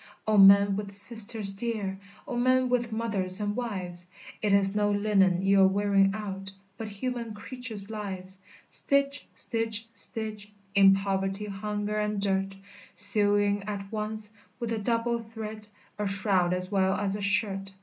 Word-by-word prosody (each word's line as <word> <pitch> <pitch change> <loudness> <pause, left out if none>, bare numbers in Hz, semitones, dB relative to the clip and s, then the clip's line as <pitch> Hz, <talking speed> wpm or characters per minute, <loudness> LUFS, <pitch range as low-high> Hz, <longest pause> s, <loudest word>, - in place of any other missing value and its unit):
"O 215 - +2
men 200 0 +7
with 205 -1 -5
sisters 215 -1 +5
dear! 200 -3 -4 0.3
O 255 - -4
men 255 +1 +2
with 240 -2 0
mothers 205 -4 -2
and 205 0 -2
wives! 185 -7 -5 0.3
It 210 - 0
is 200 0 +3
no 205 0 +1
linen 200 -3 +2
you're 195 0 +5
wearing 195 0 +2
out, 195 -2 -6 0.2
But 220 +2 -6
human 230 +1 -5
creatures' 220 -3 -4
lives! 190 -3 -5 0.3
Stitch! 280 0 +1
stitch! 225 -1 0
stitch, 215 -1 -1 0.2
In 195 -1 +6
poverty, 195 +1 -2
hunger, 210 +1 -4
and 210 -1 -1
dirt, 195 -1 -1 0.4
Sewing 205 +1 +2
at 195 -2 -6
once, 215 0 -3 0.3
with 235 -2 -4
a 225 - -2
double 235 +2 -1
thread, 220 -1 -8 0.3
A 210 - -1
shroud 190 -2 +3
as 180 +1 -3
well 190 -1 +2
as 200 -1 -2
a 205 - -5
shirt! 195 -1 0
205 Hz, 150 wpm, -27 LUFS, 195-220 Hz, 0.4 s, men